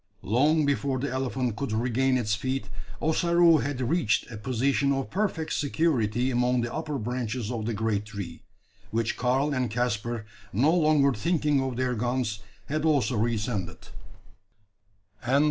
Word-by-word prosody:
Long 145 Hz, -, +3 dB
before 140 Hz, -1 st, 0 dB
the 140 Hz, +1 st, -2 dB
elephant 130 Hz, -2 st, -1 dB
could 140 Hz, -5 st, -3 dB
regain 125 Hz, +3 st, +1 dB
its 110 Hz, -4 st, 0 dB
feet, 130 Hz, 0 st, -2 dB, 0.3 s
Ossaroo 170 Hz, +1 st, +4 dB
had 140 Hz, 0 st, -2 dB
reached 125 Hz, -4 st, +1 dB
a 110 Hz, -, -6 dB
position 130 Hz, +5 st, +1 dB
of 135 Hz, -1 st, -2 dB
perfect 185 Hz, -5 st, -1 dB
security 130 Hz, -6 st, +1 dB
among 125 Hz, 0 st, +2 dB
the 120 Hz, 0 st, -3 dB
upper 155 Hz, -2 st, -3 dB
branches 120 Hz, -1 st, -3 dB
of 115 Hz, -3 st, -3 dB
the 115 Hz, -, -1 dB
great 105 Hz, -1 st, -1 dB
tree; 100 Hz, -6 st, -7 dB, 0.5 s
which 115 Hz, +1 st, -1 dB
Karl 130 Hz, +4 st, +1 dB
and 125 Hz, -3 st, 0 dB
Caspar, 120 Hz, -1 st, -2 dB, 0.3 s
no 135 Hz, -, +3 dB
longer 150 Hz, -4 st, +4 dB
thinking 150 Hz, +1 st, +1 dB
of 130 Hz, -2 st, -2 dB
their 125 Hz, 0 st, 0 dB
guns, 120 Hz, -1 st, -1 dB, 0.3 s
had 155 Hz, +1 st, -2 dB
also 145 Hz, -5 st, +2 dB
re 115 Hz, +2 st, +1 dB
ascended. 105 Hz, -4 st, -4 dB
125 Hz, 145 wpm, -27 LUFS, 115-140 Hz, 0.5 s, Ossaroo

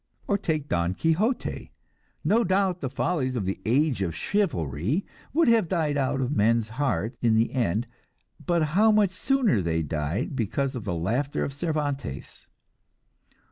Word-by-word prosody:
Or 200 Hz, -, +2 dB
take 160 Hz, -7 st, -1 dB
Don 85 Hz, -2 st, 0 dB
Quixote. 185 Hz, -, 0 dB, 0.5 s
No 230 Hz, +3 st, +3 dB
doubt 185 Hz, -1 st, +1 dB
the 135 Hz, -, -2 dB
follies 135 Hz, -2 st, -1 dB
of 110 Hz, -6 st, -2 dB
the 95 Hz, -, -3 dB
"age 135 Hz, 0 st, +2 dB
of 85 Hz, -4 st, -1 dB
chivalry" 130 Hz, -, -1 dB, 0.3 s
would 330 Hz, +3 st, +3 dB
have 230 Hz, -6 st, +4 dB
died 160 Hz, -4 st, 0 dB
out 135 Hz, -1 st, 0 dB
of 130 Hz, +3 st, -1 dB
men's 115 Hz, 0 st, +2 dB
hearts 120 Hz, -3 st, -1 dB
in 115 Hz, -2 st, +3 dB
the 115 Hz, +1 st, +2 dB
end; 115 Hz, -3 st, 0 dB, 0.6 s
but 170 Hz, -3 st, +1 dB
how 215 Hz, +4 st, +5 dB
much 210 Hz, -3 st, +3 dB
sooner 225 Hz, -, +1 dB
they 80 Hz, -1 st, 0 dB
died 75 Hz, -, -2 dB
because 130 Hz, +3 st, -1 dB
of 120 Hz, -5 st, -6 dB
the 90 Hz, -4 st, -2 dB
laughter 120 Hz, -, -1 dB
of 140 Hz, -, -3 dB
Cervantes! 145 Hz, -, -4 dB
140 Hz, 155 wpm, -26 LUFS, 105-175 Hz, 0.6 s, how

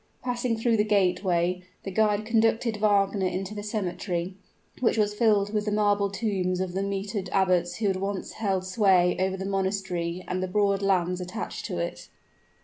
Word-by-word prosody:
Passing 245 Hz, -2 st, -1 dB
through 225 Hz, 0 st, +2 dB
the 210 Hz, -, +3 dB
gateway, 180 Hz, -3 st, +1 dB, 0.2 s
the 195 Hz, -, -5 dB
guide 210 Hz, +1 st, +2 dB
conducted 225 Hz, 0 st, +2 dB
Wagner 200 Hz, -2 st, +2 dB
into 185 Hz, +3 st, -3 dB
a -, -, -4 dB
cemetery, 185 Hz, -4 st, -3 dB, 0.5 s
which 235 Hz, -2 st, +2 dB
was 210 Hz, -1 st, +2 dB
filled 210 Hz, -2 st, +2 dB
with 210 Hz, -1 st, 0 dB
the 210 Hz, -, -1 dB
marble 205 Hz, -1 st, +2 dB
tombs 190 Hz, -3 st, -1 dB
of 185 Hz, -1 st, -2 dB
the 190 Hz, -, -1 dB
mitered 195 Hz, 0 st, -3 dB
abbots 180 Hz, -2 st, +2 dB
who 220 Hz, -, -3 dB
had 195 Hz, -2 st, +2 dB
once 195 Hz, 0 st, -3 dB
held 195 Hz, -4 st, -1 dB
sway 185 Hz, -3 st, +3 dB
over 190 Hz, 0 st, 0 dB
the 190 Hz, -, -5 dB
monastery 190 Hz, -3 st, -2 dB
and 185 Hz, 0 st, -2 dB
the 185 Hz, -, -1 dB
broad 200 Hz, +1 st, +1 dB
lands 180 Hz, -2 st, +1 dB
attached 180 Hz, 0 st, -5 dB
to -, -, -4 dB
it. 85 Hz, 0 st, -4 dB
195 Hz, 175 wpm, -27 LUFS, 185-210 Hz, 0.5 s, the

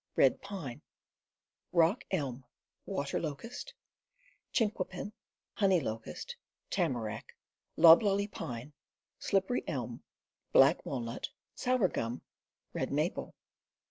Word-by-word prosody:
Strong 135 Hz, -, +6 dB, 0.2 s
Woods 160 Hz, -12 st, -5 dB, 0.9 s
Rock 170 Hz, +6 st, +4 dB
Ehn, 135 Hz, -8 st, -1 dB, 0.4 s
Water 140 Hz, -8 st, -1 dB
Locust, 230 Hz, -, -5 dB, 0.8 s
Chinquapin, 205 Hz, -3 st, -1 dB, 0.4 s
Honey 190 Hz, -4 st, +4 dB
Locust, 110 Hz, -, -5 dB, 0.4 s
Tamarack, 110 Hz, -4 st, -1 dB, 0.4 s
Loblolly 195 Hz, +5 st, +7 dB
Pine, 130 Hz, -, -6 dB, 0.5 s
Slippery 195 Hz, +5 st, +1 dB
Elm, 125 Hz, -5 st, -3 dB, 0.5 s
Black -, -, +6 dB
Walnut, 120 Hz, -3 st, -3 dB, 0.2 s
Sour 250 Hz, -6 st, +2 dB
Gum, 120 Hz, -6 st, -3 dB, 0.5 s
Red -, -, -2 dB
Maple. -, -, -1 dB
165 Hz, 85 wpm, -32 LUFS, 125-200 Hz, 0.9 s, Loblolly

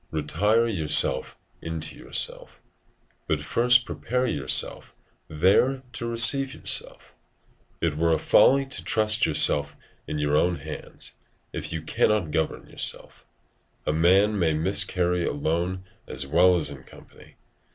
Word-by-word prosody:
Retire 95 Hz, +10 st, 0 dB
yourself 80 Hz, -, +2 dB, 0.2 s
into 80 Hz, -1 st, -5 dB
yourself, -, -, -2 dB, 0.7 s
but 80 Hz, -, 0 dB
first 120 Hz, +10 st, +2 dB
prepare 125 Hz, +1 st, -3 dB
yourself 70 Hz, -, 0 dB, 0.3 s
there 100 Hz, -, +1 dB
to 115 Hz, -, -5 dB
receive 115 Hz, +4 st, +2 dB
yourself: -, -, -5 dB, 0.7 s
it 80 Hz, -3 st, -1 dB
were 85 Hz, +2 st, +1 dB
a 80 Hz, -, +2 dB
folly 135 Hz, +1 st, +4 dB
to 135 Hz, -, -5 dB
trust 110 Hz, -1 st, +2 dB
yourself 75 Hz, 0 st, +3 dB, 0.3 s
in -, -, -4 dB
your 75 Hz, 0 st, 0 dB
own 90 Hz, +3 st, +2 dB
hands, -, -, -8 dB, 0.4 s
if -, -, -5 dB
you 80 Hz, -1 st, -5 dB
cannot 90 Hz, 0 st, 0 dB
govern 80 Hz, 0 st, -2 dB
yourself. -, -, -3 dB, 0.6 s
A -, -, 0 dB
man 95 Hz, +6 st, +3 dB
may 80 Hz, -3 st, +1 dB
miscarry 90 Hz, 0 st, +1 dB
alone 85 Hz, +5 st, -2 dB, 0.2 s
as 65 Hz, -, -6 dB
well 90 Hz, +6 st, +4 dB
as 75 Hz, -4 st, 0 dB
in 70 Hz, -2 st, -10 dB
company. -, -, -18 dB
85 Hz, 130 wpm, -24 LUFS, 75-110 Hz, 0.7 s, folly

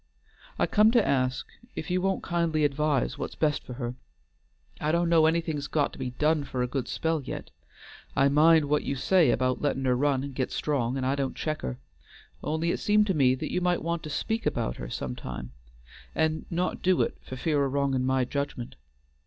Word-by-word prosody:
I -, -, +3 dB
come 215 Hz, +1 st, +5 dB
to 235 Hz, -4 st, +4 dB
ask 130 Hz, -1 st, +1 dB, 0.3 s
if -, -, -5 dB
you 180 Hz, 0 st, +1 dB
won't 190 Hz, 0 st, 0 dB
kindly 165 Hz, -3 st, +1 dB
advise 145 Hz, -1 st, 0 dB
what's -, -, -4 dB
best 150 Hz, -2 st, +1 dB
for 125 Hz, -, -8 dB
her. 120 Hz, -1 st, -4 dB, 0.9 s
I 150 Hz, -, 0 dB
do' 170 Hz, +1 st, +2 dB
know's 165 Hz, -2 st, +5 dB
anything's 160 Hz, -3 st, 0 dB
got 150 Hz, -2 st, 0 dB
to -, -, -11 dB
be 130 Hz, -1 st, -2 dB
done 150 Hz, +4 st, +1 dB
for 130 Hz, -2 st, -2 dB
a -, -, 0 dB
good 130 Hz, 0 st, -3 dB
spell 160 Hz, -1 st, -1 dB
yet. -, -, -7 dB, 0.6 s
I 135 Hz, -, +4 dB
mind 155 Hz, +2 st, +5 dB
what 150 Hz, +1 st, +1 dB
you 140 Hz, -, -2 dB
say 175 Hz, +5 st, +3 dB
about 130 Hz, 0 st, +1 dB
lettin' 135 Hz, -2 st, 0 dB
her 125 Hz, -1 st, +3 dB
run 135 Hz, 0 st, +1 dB
and 140 Hz, -1 st, -6 dB
git 130 Hz, -1 st, -2 dB
strong, 135 Hz, -4 st, -1 dB
and 130 Hz, -, -2 dB
I 130 Hz, -, +2 dB
don't 140 Hz, -2 st, -2 dB
check 155 Hz, -1 st, -3 dB
her. 60 Hz, 0 st, -4 dB, 0.7 s
Only 160 Hz, +3 st, 0 dB
it -, -, -2 dB
seemed 210 Hz, 0 st, +3 dB
to 195 Hz, -, +1 dB
me 130 Hz, -5 st, +4 dB
that 130 Hz, -, -5 dB
you 180 Hz, -, 0 dB
might 180 Hz, -2 st, +1 dB
want 170 Hz, 0 st, -1 dB
to 155 Hz, -, -7 dB
speak 225 Hz, +9 st, -1 dB
about -, -, -1 dB
her -, -, -6 dB
sometimes 60 Hz, -1 st, -5 dB, 0.6 s
and 160 Hz, 0 st, 0 dB
not 175 Hz, +2 st, -1 dB
do 185 Hz, -1 st, +3 dB
it -, -, -4 dB
for 130 Hz, -, -8 dB
fear 145 Hz, +1 st, +1 dB
o' -, -, +1 dB
wronging 135 Hz, -1 st, 0 dB
my 130 Hz, 0 st, +2 dB
judgment. 140 Hz, -2 st, -4 dB
145 Hz, 210 wpm, -27 LUFS, 130-165 Hz, 0.9 s, come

